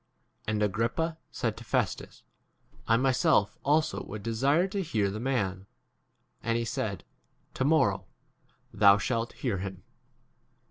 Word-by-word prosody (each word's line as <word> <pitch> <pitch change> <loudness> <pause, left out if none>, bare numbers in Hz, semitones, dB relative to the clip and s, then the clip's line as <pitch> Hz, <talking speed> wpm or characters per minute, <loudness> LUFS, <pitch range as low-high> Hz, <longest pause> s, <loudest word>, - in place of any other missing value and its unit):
And 105 0 +1
Agrippa 120 - -1
said - - -2
to - - -9
Festus, - - -2 0.6
I 115 - +5
myself 130 -5 +2
also 150 +2 +2
would 105 -1 -7
desire 135 - +2
to 195 0 -2
hear 105 - 0
the 105 - -5
man. 100 -7 -1 0.7
And 115 0 0
he 115 - -1
said, - - -3 0.5
To - - -1
morrow 145 -10 +2 0.4
£ - - -36 0.3
thou 100 -1 +8
shalt 115 +2 -1
hear 115 -8 -2
him. 95 -1 -6
115 Hz, 135 wpm, -29 LUFS, 105-135 Hz, 0.7 s, thou